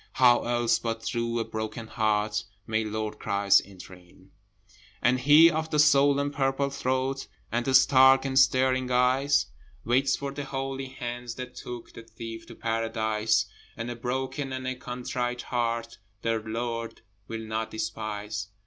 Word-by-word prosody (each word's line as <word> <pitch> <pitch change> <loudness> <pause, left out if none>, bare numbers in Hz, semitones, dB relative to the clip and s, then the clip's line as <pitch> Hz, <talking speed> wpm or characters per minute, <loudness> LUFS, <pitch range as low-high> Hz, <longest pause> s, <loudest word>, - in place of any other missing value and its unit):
How 125 -2 +5
else 120 -1 +2
but 115 -1 -3
through 115 0 -2
a 115 - -1
broken 110 +1 -5
heart 105 -1 0 0.2
May 110 0 0
Lord 110 0 -4
Christ 100 0 +3
enter 95 -1 -12
in? 90 +1 -18 0.7
And 125 +1 +2
he 150 +5 +7
of 160 0 -2
the 150 - 0
swollen 145 -1 +4
purple 140 0 0
throat. 130 0 -1 0.2
And 120 +1 -1
the 135 - +3
stark 130 +1 +6
and 135 0 +2
staring 130 -1 +3
eyes, 125 0 +3 0.4
Waits 130 +3 +2
for 140 0 -5
the 140 0 -5
holy 135 0 -4
hands 120 -2 -6
that 125 -1 -7
took 120 -1 -8
The - - -9
Thief 115 0 -9
to - - -11
Paradise; 110 -1 0 0.3
And 115 +2 -4
a - - -5
broken 130 +3 -3
and 130 0 -4
a 130 - -1
contrite 125 0 -4
heart 115 -1 -2 0.2
The 115 -1 +1
Lord 115 +1 -4 0.3
will 115 0 -5
not 110 0 -3
despise. 105 -3 -4
120 Hz, 155 wpm, -27 LUFS, 110-130 Hz, 0.7 s, he